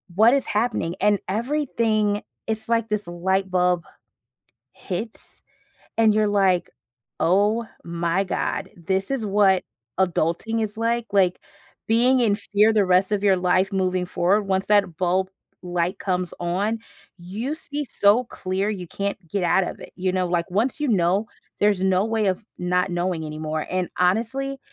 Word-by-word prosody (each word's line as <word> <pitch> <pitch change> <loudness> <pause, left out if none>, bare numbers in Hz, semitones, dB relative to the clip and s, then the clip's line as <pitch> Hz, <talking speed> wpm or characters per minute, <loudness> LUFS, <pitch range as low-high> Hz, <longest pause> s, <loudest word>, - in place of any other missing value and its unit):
"What 225 +5 +6
is 275 - +1
happening?" 210 -6 -1
And 205 -1 +3
everything 220 -3 0 0.2
it's 220 0 -3
like 230 -1 +1
this 210 -3 -2
light 190 +2 -1
bulb 180 -1 +1 0.9
hits 215 +5 -7 0.6
and 220 -2 +5
you're, 215 0 +3
like, 190 -3 +2 0.5
"Oh, 205 +6 +2 0.2
my 170 +3 0
God, - - -2
this 190 +5 -2
is 245 -6 -1
what 195 -2 +3 0.4
adulting 190 +5 0
is 215 0 -4
like." 230 0 0
Like, 185 -3 +3 0.5
being 245 +3 +4
in 215 -4 +3
fear 210 +1 +3
the 210 -3 +3
rest 185 +2 +3
of 205 -1 0
your 195 -2 +5
life 185 +1 +2
moving 185 -1 0
forward, 185 +4 +2
once 190 0 0
that 200 -5 +3
bulb 185 +1 +1 0.3
light 175 0 -1
comes 180 -2 -2
on, 195 +6 -1 0.4
you 210 - -4
see 295 -2 -5
so 215 0 +3
clear 195 -2 -2
you 185 -4 -5
can't 200 0 -3
get 190 +2 -1
out 180 +2 +3
of - - -6
it - - -11
you 185 0 0
know, 185 -1 0
like, 175 0 -1
once 230 +10 0
you 295 - 0
know, 195 +1 +2 0.3
there's 205 -2 +3
no 190 0 +3
way 220 -1 0
of 190 +3 0 0.2
not 180 +1 0
knowing 175 -2 -1
anymore. 155 0 -4
And 185 -1 -1
honestly, 235 +9 0
195 Hz, 160 wpm, -23 LUFS, 180-220 Hz, 0.9 s, What